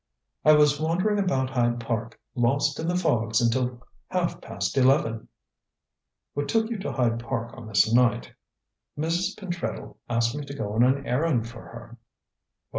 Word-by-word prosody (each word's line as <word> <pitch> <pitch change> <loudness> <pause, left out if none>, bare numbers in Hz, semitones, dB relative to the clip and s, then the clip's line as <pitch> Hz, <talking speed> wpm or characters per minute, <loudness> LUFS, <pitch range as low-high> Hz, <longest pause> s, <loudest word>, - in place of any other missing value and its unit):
"I 155 - +7
was 150 -1 +4
wandering 185 +6 +1
about 135 -9 0
Hyde 120 -2 +1
Park, 115 -1 -4
lost 140 +4 +1
in 160 - -2
the 175 - 0
fogs 115 -10 +1
until 125 +1 0 0.2
half 180 -2 -2
past 100 +2 -4
eleven." 125 -4 +2 1.1
"What 145 0 -3
took 225 0 +1
you 225 - -3
to 195 - -3
Hyde 115 -3 0
Park 115 -1 -4
on 120 -4 -10
this 110 +1 +3
night?" 120 - +2 0.6
"Mrs. 170 +5 -1
Pentreddle 175 -4 -5
asked 115 +1 +1
me 150 - -4
to 140 - -7
go 105 -5 -4
on 110 - +2
an 135 +3 +3
errand 125 -2 +1
for 115 0 -10
her." 115 +1 -12
125 Hz, 160 wpm, -26 LUFS, 115-155 Hz, 1.1 s, I